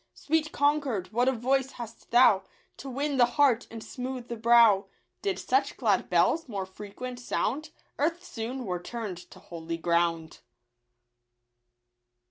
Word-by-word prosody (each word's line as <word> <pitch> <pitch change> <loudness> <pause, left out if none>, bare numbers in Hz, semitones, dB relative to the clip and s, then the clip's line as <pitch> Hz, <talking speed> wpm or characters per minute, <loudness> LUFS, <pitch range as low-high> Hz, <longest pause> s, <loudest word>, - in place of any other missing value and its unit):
Sweet 310 0 0
Concord, 280 -10 0
what 245 +3 +2
a - - +3
voice 265 +2 0
hast 230 -2 -10
thou 235 -5 +6 0.4
To 275 - -8
win 280 +2 -2
the 245 -2 +6
heart 265 -5 +4
and 225 -1 -8
smooth 250 -1 -6
the 235 - -3
brow! 230 -3 +5 0.3
Did 395 -2 -1
such 395 - 0
glad - - +1
bells 325 -4 +2
more 195 -4 -3
frequent 210 +6 -8
sound, 275 +5 -2 0.3
Earth 335 +5 0
soon 250 -3 -5
were 180 -3 -3
turn'd 215 -3 -5
to - - -14
holy 165 -1 -6
ground. 170 -1 0
240 Hz, 140 wpm, -28 LUFS, 200-275 Hz, 0.4 s, thou